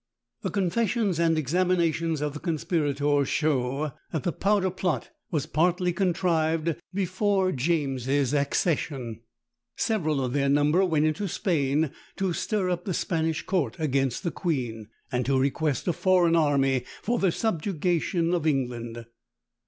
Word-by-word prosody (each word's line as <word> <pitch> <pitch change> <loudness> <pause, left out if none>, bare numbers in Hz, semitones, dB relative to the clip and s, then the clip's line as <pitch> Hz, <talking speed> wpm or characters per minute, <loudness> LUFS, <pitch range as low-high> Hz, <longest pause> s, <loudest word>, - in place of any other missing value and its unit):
The - - -2
confessions 200 0 0
and 165 -1 +3
examinations 165 0 +1
of 150 -1 -1
the 150 - -6
conspirators 145 -4 0
show 145 -1 0 0.2
that 160 - -2
the 175 - 0
powder 195 +1 +1
plot 180 -2 -2 0.2
was 155 -5 -1
partly 175 +3 +1
contrived 165 -3 +1 0.2
before 190 0 +1
James's 135 -2 0
accession. 140 - -1 0.5
Several 155 - 0
of 125 - -3
their 140 -1 +1
number 145 +6 +3
went 155 -4 +2
into 155 +6 0
Spain 150 -5 0 0.2
to 190 -2 -1
stir 205 +1 -1
up 175 0 -3
the 185 - -1
Spanish 160 -2 -1
court 165 - -1
against 135 -4 0
the 170 - -1
queen, 120 - -3 0.2
and 125 -1 0
to 135 -1 +3
request 140 +2 0
a 175 - +2
foreign 180 -1 +3
army 135 -5 +2 0.2
for 240 +2 0
the 190 -3 +3
subjugation 175 -3 0
of 165 -3 0
England. 120 -5 -2
160 Hz, 135 wpm, -26 LUFS, 140-180 Hz, 0.5 s, and